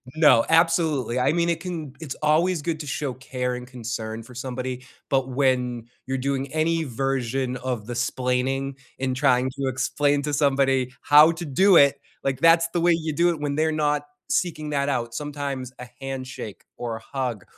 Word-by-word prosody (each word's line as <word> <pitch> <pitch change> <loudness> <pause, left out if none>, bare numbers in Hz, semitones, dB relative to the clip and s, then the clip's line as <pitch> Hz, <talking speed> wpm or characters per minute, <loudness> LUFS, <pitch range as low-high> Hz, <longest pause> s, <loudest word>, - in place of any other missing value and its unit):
No, 150 -7 +6
absolutely. 165 -7 +2
I 135 +4 +2
mean, 170 0 +1
it 165 -1 0
can 165 -5 -5
it's 150 -5 -6
always 160 +2 +2
good 165 0 -2
to 150 - -6
show 140 -1 -2
care, 125 -1 -3
and 125 0 -8
concern, 115 -2 -5
for 125 - -14
somebody, 130 0 -5 0.2
but 135 -1 +1
when 125 -3 0 0.2
you're 135 +1 -2
doing 135 +1 -1
any 160 +1 +1
version 130 0 -1
of 125 -4 -4
the 120 - -4
'splaining 130 +2 -1 0.2
and 130 -1 -1
trying 130 -2 +3
to 135 -1 -1
explain 140 +2 +1
to 150 0 -3
somebody 135 -3 +2
how 150 +3 +7
to 170 +1 -6
do 185 +7 +4
it. 140 -1 +5 0.2
Like, 135 -1 -1
that's 165 +1 +5
the 175 - +1
way 175 0 +5
you 160 -2 -2
do 170 +4 +3
it 165 - -5
when 145 -1 -1
they're 160 +1 +2
not 150 -1 +1 0.3
seeking 155 -4 -1
that 140 -1 0
out. 120 -4 -2
Sometimes 140 -3 -4
a 125 - -8
handshake, 130 -5 -6
or 120 -2 -3
a - - -13 0.2
hug, 120 -7 -2
135 Hz, 185 wpm, -24 LUFS, 125-155 Hz, 0.3 s, how